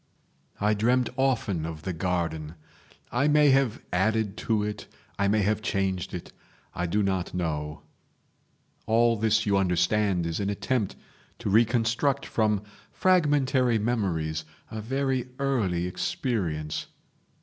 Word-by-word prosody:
"I 105 +1 +2
dreamt 120 +4 +2
often 115 -10 0
of 80 -1 -6
the 95 - -2
garden. 80 -3 -2 0.6
I 130 +4 +2
may 150 -1 +5
have 135 -4 +2
added 110 +2 +1
to 110 -2 +2
it, 105 -1 -4 0.3
I 100 - +3
may 105 +1 +2
have 105 +2 +1
changed 95 -5 -1
it; 90 - -8 0.4
I 90 - -2
do 105 +5 +1
not 95 -2 -1
know..... 75 -3 -3 1.0
All 115 +1 +4
this 110 0 +2
you 100 -2 +3
understand 90 0 +2
is 85 -1 -2
an 100 -1 -1
attempt 105 +1 -1 0.4
to 100 - -3
reconstruct 120 +5 +2
from 105 -2 +1 0.3
fragmentary 145 -9 +3
memories 90 -9 -1 0.3
a 110 - -4
very 130 +1 -1
early 105 -11 0
experience. 90 - -2
105 Hz, 125 wpm, -27 LUFS, 90-120 Hz, 1.0 s, may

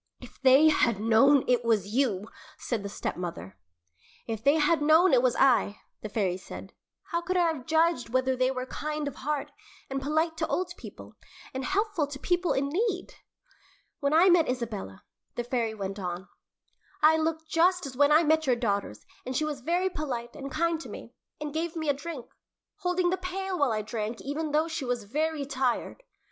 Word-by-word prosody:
"If - - -14
they 270 +4 +7
had 235 -8 +2
known 240 +6 +5
it 245 -1 +2
was 215 -3 +1
you 225 -6 +1 0.2
" - - -21
said 235 -4 -1
the 200 - -5
stepmother. 170 - -5 0.7
"If 225 -2 -5
they 280 +2 +5
had 310 +1 +3
known 320 +4 +5
it 250 - +6
was 250 -2 +2
I," 240 -6 +3 0.2
the 215 - -6
fairy 195 -4 0
said, 185 - -10 0.4
"how 340 -1 0
could 365 +2 -1
I 355 - +4
have 260 -5 -10
judged 320 -6 +2
whether 260 +2 +1
they 255 0 +2
were 255 -1 -3
kind 300 +2 -4
of 285 - -6
heart, 295 +1 -3 0.4
and 270 0 -2
polite 315 +3 0
to 320 - -1
old 360 -1 -2
people, - - -12 0.4
and 265 0 -3
helpful 390 -4 0
to 285 -1 -7
people 355 +4 0
in 275 +1 0
need?" 375 +3 -1 0.9
"When 280 0 0
I 330 +4 +6
met 340 -5 +4
Isabella," 220 - -4 0.3
the 240 - -2
fairy 235 -2 -1
went 195 -1 -5
on, 180 0 -5 0.8
"I 315 +1 +6
looked 320 0 -2
just 355 +2 +2
as 265 -2 -7
when 285 +2 +4
I 310 +3 +6
met 315 -1 +2
your 250 - +4
daughters, 200 - -2 0.2
and 255 0 -3
she 310 - +1
was 295 -3 -4
very 350 +7 +1
polite 245 -7 -4
and 275 0 -6
kind 330 +3 0
to - - -9
me, - - -10 0.3
and 300 -1 -5
gave 325 +1 -2
me 315 -2 -2
a - - +4
drink, 285 -2 -7 0.5
holding 360 -2 0
the 375 - 0
pail 370 0 -4
while 285 -4 +3
I 215 -1 -1
drank, 220 +1 -4
even 300 +3 -3
though 305 +2 +2
she 320 -3 -4
was 245 -3 -2
very 300 +6 -1
tired. 265 - -2
280 Hz, 195 wpm, -28 LUFS, 235-320 Hz, 0.9 s, they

